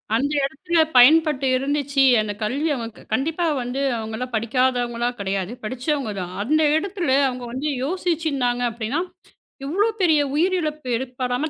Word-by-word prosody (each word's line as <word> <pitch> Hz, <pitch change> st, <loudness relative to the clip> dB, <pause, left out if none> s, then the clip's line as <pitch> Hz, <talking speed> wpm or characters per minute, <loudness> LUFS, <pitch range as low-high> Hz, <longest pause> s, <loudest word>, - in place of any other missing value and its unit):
அந்த 280 Hz, +5 st, 0 dB
இடத்துல 330 Hz, +6 st, -1 dB, 0.2 s
பயன்பட்டு 295 Hz, +2 st, +6 dB
இருந்துச்சு. 280 Hz, +1 st, 0 dB, 0.2 s
எனக்குக் 210 Hz, 0 st, -3 dB
கல்வி 275 Hz, +9 st, -1 dB
அவ 235 Hz, -3 st, -4 dB, 0.3 s
கண்டிப்பா 320 Hz, +8 st, 0 dB, 0.2 s
வந்து. 245 Hz, +3 st, -3 dB, 0.2 s
அவங்க 220 Hz, 0 st, -5 dB
எல்லாம் 250 Hz, +1 st, -5 dB
படிக்காதவங்களா? 240 Hz, +1 st, 0 dB
கிடையாது. 195 Hz, 0 st, -2 dB
படிச்சவங்க 255 Hz, +1 st, -2 dB
தான். 180 Hz, 0 st, -6 dB
அந்த 310 Hz, +7 st, +2 dB, 0.2 s
இடத்துல 360 Hz, -3 st, -3 dB, 0.2 s
அவங்க 250 Hz, -1 st, -5 dB
வந்து 270 Hz, +4 st, -3 dB, 0.2 s
யோசிச்சு 335 Hz, +1 st, -1 dB
இருந்தாங்க. 245 Hz, -3 st, 0 dB
அப்படின்னா 235 Hz, +7 st, -2 dB, 0.6 s
இவ்ளோ 390 Hz, +10 st, +1 dB
பெரிய 320 Hz, -4 st, +4 dB, 0.2 s
உயிரிழப்பு 310 Hz, -5 st, 0 dB
ஏற்ப்படாம 250 Hz, +3 st, -2 dB
265 Hz, 135 wpm, -22 LUFS, 240-310 Hz, 0.6 s, பயன்பட்டு